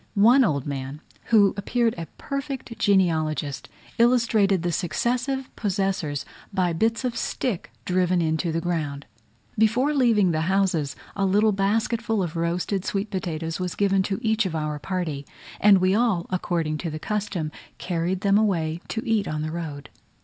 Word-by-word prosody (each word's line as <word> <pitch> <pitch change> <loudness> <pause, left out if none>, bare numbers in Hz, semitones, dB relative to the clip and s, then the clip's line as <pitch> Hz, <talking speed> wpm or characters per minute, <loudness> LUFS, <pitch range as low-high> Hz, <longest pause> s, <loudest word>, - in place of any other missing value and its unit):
One 235 +7 +6
old 140 - 0
man, 140 0 -5 0.3
who 205 -4 +5
appeared 230 +3 +1
a 165 -1 -6
perfect 275 -3 -5
genealogist, 160 -7 +1 0.3
illustrated 225 -6 +3
the 175 - 0
successive 250 - -1
possessors 190 -8 -1 0.3
by 185 -3 +1
bits 225 +8 0
of 245 -2 -1
stick 230 -3 -2 0.2
driven 180 0 +2
into 160 0 0
the 165 +1 -1
ground. 150 -5 -2 0.5
Before 245 +7 +3
leaving 230 -9 +3
the 155 -1 0
houses 170 -5 +1 0.2
a 200 - -1
little 205 +3 +3
basketful 215 +2 0
of 170 -1 -4
roasted 175 +3 -1
sweet 200 +2 -2
potatoes 165 -4 -3
was 180 -1 -3
given 195 -1 +2
to 195 - -1
each 220 -2 +2
of 165 - -5
our 150 -1 -2
party; 170 -6 -3 0.4
and 205 -1 +7
we 185 +1 +2
all, 210 -6 +2
according 165 -4 -1
to 170 - -3
the 155 - -5
custom, 195 -4 -3 0.3
carried 180 +1 -2
them 200 0 +4
away 170 -6 0
to 225 - -4
eat 220 -3 +1
on 155 0 -2
the 155 - -3
road. 155 -4 -6
190 Hz, 155 wpm, -24 LUFS, 165-215 Hz, 0.5 s, and